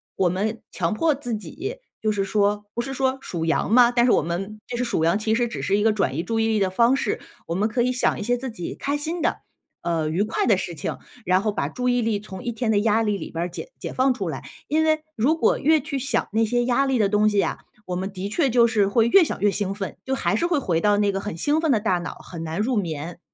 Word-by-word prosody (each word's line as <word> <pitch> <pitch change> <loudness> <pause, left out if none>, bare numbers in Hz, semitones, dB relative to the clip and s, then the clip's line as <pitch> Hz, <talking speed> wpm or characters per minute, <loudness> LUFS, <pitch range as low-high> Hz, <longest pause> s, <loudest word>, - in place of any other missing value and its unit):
我 190 - +2
们 210 +5 -2
强 170 -3 -1
迫 310 +9 +2
自 245 -5 -3
己， 340 - -6 0.2
就 215 -1 +1
是 200 -2 0
说 205 +1 +1
不 235 - -1
是 270 +3 -5
说 265 0 0
数 165 -8 -4
羊 165 +4 0
嘛， 240 0 +6
但 240 -1 +3
是 - - +4
我 - - +3
们 195 +6 -4
就 245 - -5
是 245 - -1
数 235 -9 0
羊 170 +5 +3
其 220 +1 +1
实 240 +1 +1
只 235 - -5
是 200 - +1
一 205 - +1
个 220 0 +4
转 195 -10 0
移 165 - -1
注 225 +1 -1
意 225 - +2
力 220 -1 +1
的 190 -2 +1
方 235 +6 +4
式。 - - -2 0.2
我 165 - -3
们 205 +5 +1
可 240 +2 +1
以 250 - +1
想 255 -1 +1
一 210 - -3
些 245 +3 +1
自 255 +1 -5
己 180 -7 -6
开 285 +1 -2
心 325 +4 -3
的， - - 0 0.4
呃， 165 -3 0
愉 175 +6 +1
快 215 - -1
的 210 -5 +5
事 175 -2 -4
情， 150 - -4 0.3
然 185 0 +3
后 215 - +1
把 205 - -2
注 250 0 -1
意 245 0 +2
力 220 -2 0
从 200 0 -9
一 240 - -2
天 230 0 -1
的 205 - +3
压 220 +1 +2
力 210 -2 0
里 - - -6
边 170 +1 -2
儿 180 - -4
解 170 +6 -8
解 - - -5
放 260 0 +3
出 200 -7 -4
来。 135 - -5 0.2
因 315 +2 +2
为 310 -1 +2
如 285 +9 +2
果 - - +2
越 315 +2 +4
去 280 -1 -4
想 275 - 0
那 225 +1 +3
些 240 +2 +1
压 255 +3 +2
力 265 - +1
的 210 -3 +3
东 210 +1 +3
西 205 - -1
呀， - - +1 0.3
我 180 - -3
们 190 +2 -3
的 190 0 -5
确 275 +4 +1
就 235 0 +5
是 215 -4 +2
会 225 +3 +3
越 360 +9 +7
想 - - -3
越 205 0 +4
兴 195 -1 -1
奋， 195 -3 -5
就 265 - -1
还 - - 0
是 340 - +1
会 340 -3 +1
回 175 -11 0
到 205 +1 +3
那 205 -1 +2
个 195 - -2
很 205 -4 -5
兴 295 - +1
奋 320 - +2
的 230 - +3
大 205 -4 +1
脑， 175 - -6
很 165 -2 -9
难 165 +3 -4
入 245 +4 +1
眠。 165 -3 -3
215 Hz, 310 characters per minute, -23 LUFS, 195-250 Hz, 0.4 s, 越